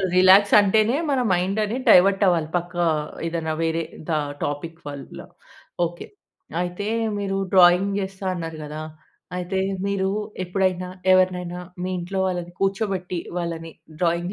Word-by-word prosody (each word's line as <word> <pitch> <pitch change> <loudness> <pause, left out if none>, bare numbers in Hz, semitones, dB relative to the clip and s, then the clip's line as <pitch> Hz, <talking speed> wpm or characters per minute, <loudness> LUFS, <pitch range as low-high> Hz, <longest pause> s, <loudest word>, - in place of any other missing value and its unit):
అసలు - - 0
రిలాక్స్ 190 +2 +6
అంటేనే 215 +5 +3
మన 270 -2 +2
మైండ్ 185 +4 0
అనేది 225 +5 -2
డైవర్ట్ 195 +2 +6
అవ్వాలి. 170 -4 +2
పక్క 175 +1 -4 0.5
ఏదైనా 165 -1 -2
వేరే 165 0 0 0.3
ద - - -2 0.3
టాపిక్ 160 +3 -4
వల్ల. 140 -1 -8 0.7
ఓకె. 175 +1 -8 0.6
అయితే 180 +3 -4 0.3
మీరు 195 -1 -2 0.2
డ్రాయింగ్ 185 +2 +6
చేస్తా 190 0 -6
అన్నారు 165 -2 -5
కదా! 150 +1 -6 0.6
అయితే 180 +1 -2 0.3
మీరు 195 -1 0 0.4
ఎప్పుడైనా, 185 0 0 0.2
ఎవరినైనా 180 -1 +2 0.2
మీ 185 - -2
ఇంట్లో 190 +2 -3
వాళ్ళని 175 -1 -4
కూర్చోబెట్టి, 195 -2 -1 0.2
వాళ్ళని 165 -1 -4 0.3
డ్రాయింగ్ 175 +2 0
180 Hz, 130 wpm, -23 LUFS, 170-195 Hz, 0.7 s, రిలాక్స్